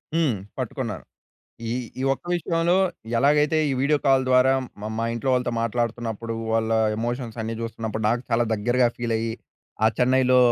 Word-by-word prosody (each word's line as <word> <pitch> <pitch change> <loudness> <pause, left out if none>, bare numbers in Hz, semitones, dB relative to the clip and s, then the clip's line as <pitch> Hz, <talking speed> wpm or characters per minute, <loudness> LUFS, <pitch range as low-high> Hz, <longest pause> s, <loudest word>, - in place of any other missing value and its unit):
హ్మ్. 160 -7 +2 0.3
పట్టుకున్నారు. 115 - -4 0.7
ఈ - - -2 0.3
ఈ - - -1
ఒక్క - - -19
విషయంలో 170 0 +1 0.4
ఎలాగైతే 150 +3 +3
ఈ - - 0
వీడియో 145 +3 +2
కాల్ 135 -1 +5
ద్వారా 130 +1 +5 0.3
మా 105 - -4
మా 115 - 0
ఇంట్లో 120 +3 -1
వాళ్ళతో 125 -1 +1
మాట్లాడుతున్నప్పుడు 115 0 -2 0.2
వాళ్ళ 110 0 +1 0.3
ఎమోషన్స్ 120 0 -3
అన్నీ 110 +1 -3
చూస్తున్నప్పుడు 115 -1 -4
నాకు 120 +2 +1
చాలా 120 +1 +3
దగ్గరగా 120 +4 +2
ఫీల్ 120 -1 -1
అయ్యి 115 0 -2 0.5
ఆ - - +7
చెన్నైలో 130 0 +4
120 Hz, 155 wpm, -24 LUFS, 115-130 Hz, 0.7 s, ఆ